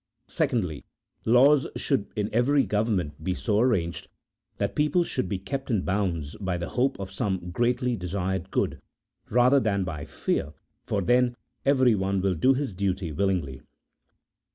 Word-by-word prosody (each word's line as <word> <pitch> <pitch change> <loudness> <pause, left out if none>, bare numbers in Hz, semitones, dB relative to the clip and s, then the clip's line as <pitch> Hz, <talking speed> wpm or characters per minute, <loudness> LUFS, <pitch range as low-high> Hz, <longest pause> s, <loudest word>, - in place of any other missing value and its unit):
Secondly, 90 - -1 0.4
laws 135 +5 +5
should 130 -8 0
in 105 -1 0
every 135 +5 +3
government 100 - -1
be 90 +2 -1
so 105 0 0
arranged 100 -9 0 0.5
that 100 0 -1
people 150 - +2
should 95 - -2
be 100 - -1
kept 135 +9 -5
in 105 -6 +1
bounds 90 -7 -1
by 95 -3 -1
the 85 - -4
hope 130 0 0
of 95 -1 -6
some 95 -4 -2
greatly 120 +4 +1
desired 95 -1 -3
good, - - -1 0.5
rather 125 +4 +5
than 100 -5 0
by 75 -5 -5
fear, 75 +2 -2 0.3
for 100 -2 0
then 125 +3 +3 0.3
everyone 110 -8 +3
will 95 0 +1
do 130 +11 +3
his 135 -5 -2
duty 95 -2 -2
willingly. 75 -6 -1
100 Hz, 150 wpm, -26 LUFS, 90-125 Hz, 0.5 s, laws